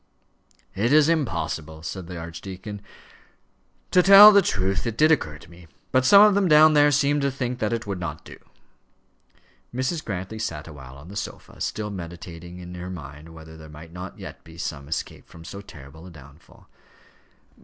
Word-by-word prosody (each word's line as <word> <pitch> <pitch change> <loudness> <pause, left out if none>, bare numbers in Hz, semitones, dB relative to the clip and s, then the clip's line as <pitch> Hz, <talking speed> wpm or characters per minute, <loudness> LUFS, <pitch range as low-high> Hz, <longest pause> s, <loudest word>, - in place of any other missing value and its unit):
"It 110 +5 0
is 150 0 +5
impossible," 80 - -2
said 90 +1 -6
the 90 - -8
archdeacon. 95 +5 -8 1.1
"To 180 - +5
tell 200 +3 +10
the 200 -1 +6
truth, 95 - -1
it 115 -1 -4
did 155 +1 +4
occur 75 - 0
to 80 +3 -17
me. 85 0 -16 0.2
But 130 0 +2
some 200 +9 +8
of 210 -1 +5
them 200 -1 +2
down 155 0 +6
there 145 0 +5
seemed 145 +1 +1
to 140 - +1
think 125 -2 -4
that 105 - -1
it 115 0 -3
would 100 -3 -4
not 80 -3 -6
do." - - -12 1.3
Mrs. 130 +6 -3
Grantly 100 +2 -6
sat 80 -8 -5
awhile 65 -4 -12
on 75 +5 -14
the 100 - -10
sofa, 100 - -8
still 105 0 -3
meditating 85 -1 -9
in 90 0 -10
her 90 +1 -7
mind 75 -2 -10
whether 80 -1 -13
there 80 -1 -13
might 80 +2 -13
not 90 +1 -8
yet - - -10
be 80 0 -15
some 70 -4 -6
escape 80 - -6
from 85 0 -14
so 100 +3 -8
terrible 80 -1 -13
a - - -11
downfall. 70 -2 -17
90 Hz, 185 wpm, -24 LUFS, 80-130 Hz, 1.3 s, tell